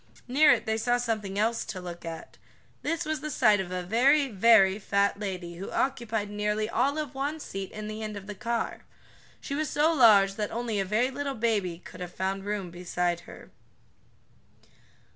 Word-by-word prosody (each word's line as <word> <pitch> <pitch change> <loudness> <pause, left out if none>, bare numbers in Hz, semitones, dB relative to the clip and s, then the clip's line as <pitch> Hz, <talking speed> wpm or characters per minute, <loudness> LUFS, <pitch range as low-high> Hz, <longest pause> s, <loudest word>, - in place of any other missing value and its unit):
Near 290 +5 +5
it - - +2
they 220 0 0
saw 245 +2 +2
something 215 -5 -2
else 225 +2 +1
to 190 - -6
look 175 -1 -8
at. 165 -1 -8 0.4
This 330 -2 -2
was 310 0 -2
the 305 - -4
sight 215 -7 +4
of 190 -2 -3
a 180 0 -3
very, 270 +9 +3
very 205 -2 +5
fat 200 0 +1
lady 180 -4 -5
who 195 - -6
occupied 230 -5 -1
nearly 210 +1 -1
all 265 +6 +1
of 300 -4 -3
one 285 +4 -3
seat 195 -9 -6
in 215 0 -6
the 215 +1 -6
end 215 -1 -4
of 195 - -9
the 210 - -6
car. 235 +2 -3 0.6
She 280 - -6
was 300 0 -1
so 310 +3 +3
large 205 -8 +6
that 210 -1 -1
only 230 -2 -2
a 195 - 0
very 220 +7 +1
little 280 0 -3
baby 210 -7 0
could 180 - -13
have 180 -1 -6
found 195 +1 -2
room 205 -4 -3
beside 175 0 -1
her. - - -12
215 Hz, 190 wpm, -28 LUFS, 195-245 Hz, 0.6 s, large